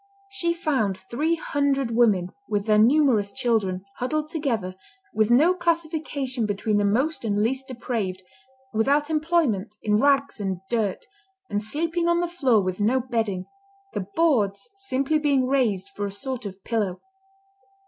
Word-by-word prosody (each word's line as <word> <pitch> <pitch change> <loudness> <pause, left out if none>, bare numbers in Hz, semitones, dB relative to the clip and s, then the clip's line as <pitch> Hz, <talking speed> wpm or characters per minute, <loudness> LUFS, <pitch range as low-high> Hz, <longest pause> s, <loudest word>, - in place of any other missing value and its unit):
She 390 -4 0
found 265 - 0
three 280 - -1
hundred 275 -6 0
women, 200 -7 +3 0.2
with 205 -1 0
their 215 -1 +4
numerous 235 -4 +4
children, 215 -7 0
huddled 305 +5 -2
together, 230 - -2 0.4
with 215 0 +2
no 300 +9 +5
classification 315 -8 -1
between 205 +1 0
the 205 - +2
most 265 +8 +1
and 205 -2 +1
least 265 +3 -1
depraved, 220 -7 -3 0.5
without 285 +7 +2
employment, 300 - +1
in 210 -1 +2
rags 275 -3 +2
and 190 -3 -2
dirt, 220 -5 -1 0.5
and 205 - 0
sleeping 330 +9 -1
on 340 0 +3
the 350 - 0
floor 265 - +2
with 185 +1 -3
no 240 +6 +3
bedding, 225 -7 -2 0.5
the 190 -3 -3
boards 215 -12 +1
simply 310 -6 0
being 280 -3 +2
raised 225 -8 +1
for 205 +1 -4
a - - -6
sort 240 +2 -4
of 190 0 -11
pillow. 210 -6 -1
240 Hz, 150 wpm, -24 LUFS, 205-295 Hz, 0.5 s, no